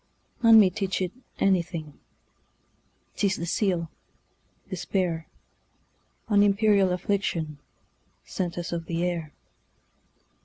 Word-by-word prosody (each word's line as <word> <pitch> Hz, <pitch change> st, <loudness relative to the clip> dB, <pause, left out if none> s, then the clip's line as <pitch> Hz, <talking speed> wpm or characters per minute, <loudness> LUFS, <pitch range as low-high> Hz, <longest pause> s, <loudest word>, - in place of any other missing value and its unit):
None 225 Hz, -2 st, +8 dB
may 195 Hz, -3 st, +5 dB
teach 195 Hz, +1 st, -2 dB
it 185 Hz, -2 st, -1 dB, 0.3 s
anything,'T 170 Hz, -, -5 dB
is 190 Hz, -, 0 dB
the 170 Hz, -, -4 dB
seal, 175 Hz, -3 st, 0 dB, 0.8 s
despair,—An 185 Hz, +3 st, -4 dB
imperial 205 Hz, -1 st, +4 dB
afflictionSent 180 Hz, -5 st, -2 dB, 1.0 s
us 175 Hz, -1 st, -4 dB
of 165 Hz, -1 st, -4 dB
the 170 Hz, 0 st, -1 dB
air. 170 Hz, -4 st, -2 dB
180 Hz, 85 wpm, -26 LUFS, 165-195 Hz, 1.0 s, None